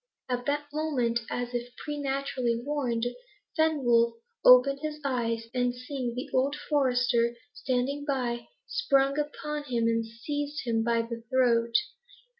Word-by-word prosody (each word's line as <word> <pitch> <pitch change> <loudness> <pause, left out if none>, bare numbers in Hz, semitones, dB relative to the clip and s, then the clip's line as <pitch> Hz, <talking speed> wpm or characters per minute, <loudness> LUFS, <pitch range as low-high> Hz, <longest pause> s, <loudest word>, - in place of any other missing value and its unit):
At 245 -1 -2
that 290 +1 0
moment, 265 -7 0
as 245 0 -3
if 245 0 -4
preternaturally 275 -5 -2
warned, 245 -3 -1 0.5
Fenwolf 250 -8 +3 0.3
opened 250 +2 +7
his 305 -1 -4
eyes, 230 -4 0
and 245 -1 +1
seeing 250 -1 -4
the 250 - -4
old 270 +3 +2
forester 245 -5 +2 0.2
standing 265 +2 -1
by, 250 -4 -2 0.2
sprang 275 - +2
upon 300 0 -3
him, 240 -4 0
and 230 0 +2
seized 290 +6 -4
him 225 -2 +1
by 230 0 +2
the 230 0 -6
throat. 235 -3 +2
250 Hz, 130 wpm, -28 LUFS, 235-285 Hz, 0.5 s, opened